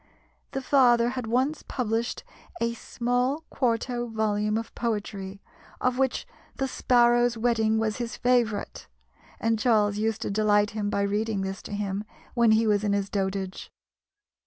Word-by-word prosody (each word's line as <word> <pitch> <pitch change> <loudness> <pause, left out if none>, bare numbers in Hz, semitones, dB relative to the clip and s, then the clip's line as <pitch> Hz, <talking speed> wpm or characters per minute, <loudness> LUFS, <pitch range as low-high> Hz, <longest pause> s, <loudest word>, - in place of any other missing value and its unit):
The 270 -1 -3
father 240 -4 +4
had 250 -2 -4
once 260 +6 +1
published 230 -2 -2 0.4
a 235 0 0
small 245 +5 -1
quarto 240 0 0
volume 215 -1 0
of 225 0 -5
poetry, 200 -4 -4 0.4
of 255 0 0
which 265 -1 0 0.3
"The 270 - -1
Sparrow's 240 -2 +3
Wedding" 220 -1 +2
was 220 -1 0
his 240 -1 -4
favourite, 240 -4 0 0.5
and 225 -1 +1
Charles 210 -3 +2
used 220 0 -1
to - - -2
delight 210 0 +3
him 210 -1 -2
by 200 - 0
reading 205 0 0
this 195 0 -4
to - - -10
him 205 0 -2 0.3
when 235 -3 +4
he 225 +1 +3
was 210 -1 +2
in 205 -1 +1
his 200 0 -1
dotage. 190 -1 -3
225 Hz, 150 wpm, -26 LUFS, 205-240 Hz, 0.5 s, father